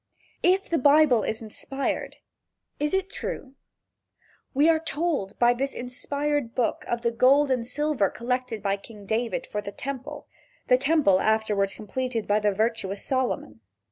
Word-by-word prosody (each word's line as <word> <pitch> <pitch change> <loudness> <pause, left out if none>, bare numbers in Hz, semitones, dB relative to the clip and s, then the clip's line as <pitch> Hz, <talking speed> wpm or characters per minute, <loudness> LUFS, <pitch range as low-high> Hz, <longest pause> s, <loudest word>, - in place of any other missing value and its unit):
If 375 +2 +3
the 335 - +1
Bible 285 -3 +5
is 220 +2 -3
inspired, 270 +5 -3 0.6
is 295 +1 0
it 385 0 0
true? 270 -8 -6 1.0
We 285 +3 +3
are 325 -1 +4
told 305 - -2
by 240 0 +5
this 270 +3 -2
inspired 280 +1 -2
book 245 - 0
of 235 0 -2
the 235 - +2
gold 270 +4 +4
and 240 -3 0
silver 280 -6 +1
collected 245 -3 -3
by 200 0 +1
King 205 0 -13
David 225 +3 -1
for 210 - -4
the 200 -1 -6
temple 275 +6 -6 0.4
the 250 - +6
temple 275 - +3
afterward 215 -2 +1
completed 235 +1 -3
by 205 +1 +3
the 210 -1 +2
virtuous 210 -1 -1
Solomon. 250 - -2
250 Hz, 150 wpm, -26 LUFS, 215-285 Hz, 1.0 s, the